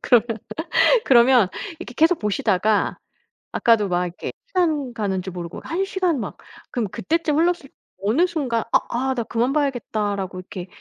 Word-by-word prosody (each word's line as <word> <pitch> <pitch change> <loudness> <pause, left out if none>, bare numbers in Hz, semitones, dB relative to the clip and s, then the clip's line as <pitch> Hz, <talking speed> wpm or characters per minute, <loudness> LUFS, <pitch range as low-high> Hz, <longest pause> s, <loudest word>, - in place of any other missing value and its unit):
그러면 235 -2 +3 0.7
그러면 240 -4 +6 0.3
이렇게 250 -8 -9
계속 325 +2 +4
보시다가 210 0 +1 0.5
아까도 225 -4 +3
막 180 0 +1
이렇게 175 0 -6 0.2
시간 310 - 0
가는 200 -4 -1
줄 185 0 -7
모르고 175 -1 -6
1 350 +4 -1
시간 365 -6 0
막 - - -5 0.3
그러면 230 -5 -2
그때쯤 315 - 0
흘렀을 340 -4 +1
때 - - -41 0.3
어느 225 - +3
순간 275 -10 -1
아 - - +6
아 265 +2 0
'나 235 - -1
그만 235 +3 0
봐야겠다.'라고 210 -9 -1
이렇게 185 0 -8
235 Hz, 340 characters per minute, -22 LUFS, 200-300 Hz, 0.7 s, 그러면